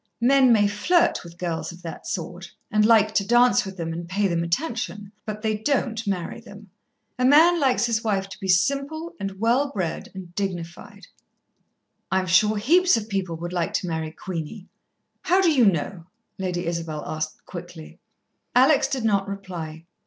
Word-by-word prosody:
Men 260 +1 +5
may 210 -3 +5
flirt 210 - +2
with 170 -1 -13
girls 170 -2 -3
of 175 +1 -14
that 165 - -8
sort, 180 +2 -5 0.2
and 210 0 +3
like 215 -1 +5
to 200 - +2
dance 240 +4 +4
with 190 0 -8
them 165 -1 -3
and 170 +1 -6
pay 200 +2 +1
them 170 -2 0
attention, 205 - -3 0.2
but 215 0 -5
they 215 -1 +1
don't 230 -1 -1
marry 190 +2 -3
them. 205 -4 -14 0.5
A - - +1
man 320 +6 +6
likes 260 -4 +2
his 230 -2 0
wife 195 -3 0
to - - -10
be 190 - -5
simple 280 - 0
and 195 -1 -5
well 245 +6 +2
bred 185 - -4
and 180 -2 -9
dignified." 175 -3 -5 1.1
"I'm 190 0 +1
sure 210 +4 +3
heaps 345 - +4
of 220 0 -5
people 190 -4 -2
would 175 +2 -6
like 175 -2 -1
to 180 - -1
marry 160 -1 -3
Queenie." 175 +3 -7 0.5
"How 365 +2 +3
do 365 -4 +4
you 255 -7 +4
know?" 170 0 -1 0.3
Lady 180 -2 -2
Isabel 165 -3 -3
asked 155 0 -5
quickly. 175 -2 -10 0.6
Alex 270 +2 +5
did 270 -4 -3
not 200 -2 +2
reply. 175 -5 -7
200 Hz, 175 wpm, -24 LUFS, 175-235 Hz, 1.1 s, man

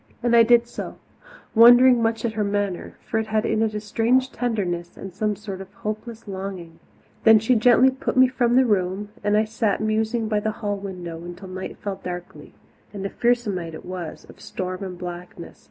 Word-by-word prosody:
And 240 -1 +3
I 230 - +8
did 235 +1 +5
so, 240 - -7 0.6
wondering 245 +2 +7
much 225 +1 0
at 225 - -1
her 215 -1 -1
manner 200 -2 -2
for 225 - -1
it 220 - -3
had 215 0 0
in 220 - +1
it 220 -1 0
a - - -1
strange 235 +5 +1
tenderness 190 -8 -3
and 195 -2 -8
some 210 +2 -1
sort 200 -2 -7
of 190 0 -11
hopeless 215 +2 -6
longing. 190 -4 -7 0.4
Then 220 -1 +8
she 225 +4 +2
gently 245 +3 +5
put 260 0 -4
me 260 0 +7
from 245 -2 +1
the 260 0 +5
room, 200 -1 0
and 205 0 +2
I 215 - +4
sat 215 -2 -1
musing 220 +1 0
by 215 -1 +1
the 215 +1 -2
hall 205 -2 -2
window 180 -4 -7
until 175 +2 -9
night 185 0 -6
fell 200 -2 -5
darkly 180 -1 -8 0.4
and 195 -2 -6
a 195 - -3
fearsome 240 -3 +1
night 165 -3 -5
it - - -11
was, 180 -3 -7
of - - -16
storm 185 +1 -5
and 185 -2 -6
blackness. 175 -1 -8
210 Hz, 205 wpm, -23 LUFS, 190-230 Hz, 0.6 s, I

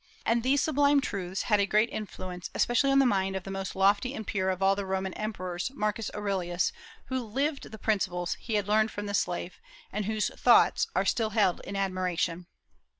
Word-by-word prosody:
And 230 +1 +2
these 270 +4 +2
sublime 290 -1 +3
truths 190 -7 -3
had 210 -3 +2
a 200 - +2
great 215 +3 +2
influence, 185 -4 -6
especially 245 +3 +2
on 275 - +4
the 275 - +5
mind 195 -4 +1
of 190 - -3
the 195 - -7
most 195 -1 -4
lofty 200 +7 +2
and 220 - -5
pure 190 -2 -1
of 185 -1 -1
all 195 0 +4
the 200 - -3
Roman 190 -1 -2
emperors, 185 -3 -4
Marcus 210 -1 -1
Aurelius, 190 - -1 0.3
who 260 -1 -2
lived 275 +6 -2
the 220 - -8
principles 190 -5 0
he 225 - -3
had 205 -1 0
learned 215 +1 +3
from 205 -1 -6
the 200 - -4
slave, 180 -2 -2 0.3
and 210 -1 -2
whose 215 0 0
"Thoughts" - - +4
are - - +2
still 225 -2 +1
held 205 -4 +2
in 200 - -6
admiration. 180 -3 -1
200 Hz, 200 wpm, -28 LUFS, 190-225 Hz, 0.3 s, the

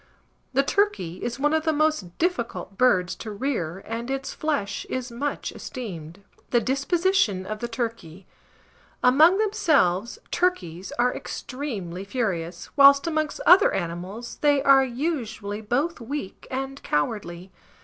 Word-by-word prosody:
The 275 +2 +3
turkey 275 - 0
is 240 +2 -3
one 295 +2 +2
of 315 0 +2
the 320 - +2
most 305 - 0
difficult 280 - -2
birds 185 -7 +3
to 220 - -7
rear, 200 - -3
and 230 +2 -4
its 270 0 -3
flesh 290 -10 -2
is 255 -1 -3
much 280 +5 -3
esteemed. 190 - -8 0.3
THE 240 - +3
DISPOSITION 275 - +1
OF 215 +2 -5
THE 235 - -3
TURKEY. 225 -7 -5 0.8
Among 310 +9 +6
themselves, 305 - +2
turkeys 190 - -1
are 245 +1 +2
extremely 205 - -5
furious, 190 -6 -3
whilst 280 0 +7
amongst 310 -2 -1
other 360 +3 +7
animals 185 +7 -5
they 290 -2 +3
are 275 -1 +7
usually 235 -6 -3
both 275 +9 -1
weak 250 -4 -6
and 270 +1 -4
cowardly. 175 +3 -2
240 Hz, 130 wpm, -25 LUFS, 195-290 Hz, 0.8 s, whilst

